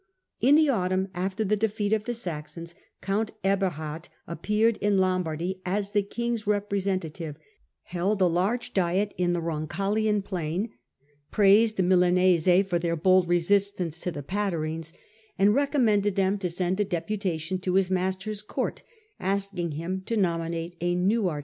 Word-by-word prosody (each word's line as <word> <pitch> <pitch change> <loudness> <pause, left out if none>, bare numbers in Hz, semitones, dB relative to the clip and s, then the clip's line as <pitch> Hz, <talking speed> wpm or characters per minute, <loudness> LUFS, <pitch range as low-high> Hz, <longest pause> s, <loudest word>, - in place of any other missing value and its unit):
In 270 +5 +5
the 310 0 +5
autumn, 190 -6 0
after 190 +4 -2
the 210 +1 +1
defeat 210 0 0
of 215 -1 0
the 240 - -2
Saxons, 170 -4 -6 0.3
count 205 +3 -1
Eberhard 175 -5 -1 0.2
appeared 210 +7 +1
in 205 -1 +1
Lombardy 185 -1 -1
as 200 +2 -2
the 205 -1 +3
king's 235 +1 -3
representative, 190 -6 -2 0.5
held 190 +4 -1
a 185 - +5
large 185 +8 0
diet 190 +2 +1
in 175 -1 +2
the 175 - 0
Roncaglian 195 +6 -1
plain, 185 +3 -3 0.6
praised 215 +2 +4
the 190 - +3
Milanese 180 0 +4
for 175 -3 0
their 170 0 -1
bold 185 +2 +4
resistance 175 -1 +1
to - - -2
the 145 -4 -6
Pataiines, 165 -3 -2 0.5
and 200 +2 +4
recommended 225 -8 +2
them 195 +1 +1
to 185 -2 -2
send 180 +2 -1
a - - +4
deputation 185 -2 -2
to 185 0 -1
his 190 -1 +2
master's 190 +3 -2
court, 210 - -3 0.4
asking 195 -3 -2
him 175 +5 -3
to 230 - 0
nominate 170 -2 -1
a 175 0 +1
new 195 +4 +2
archbishop. 155 -4 -2
190 Hz, 150 wpm, -26 LUFS, 175-205 Hz, 0.6 s, In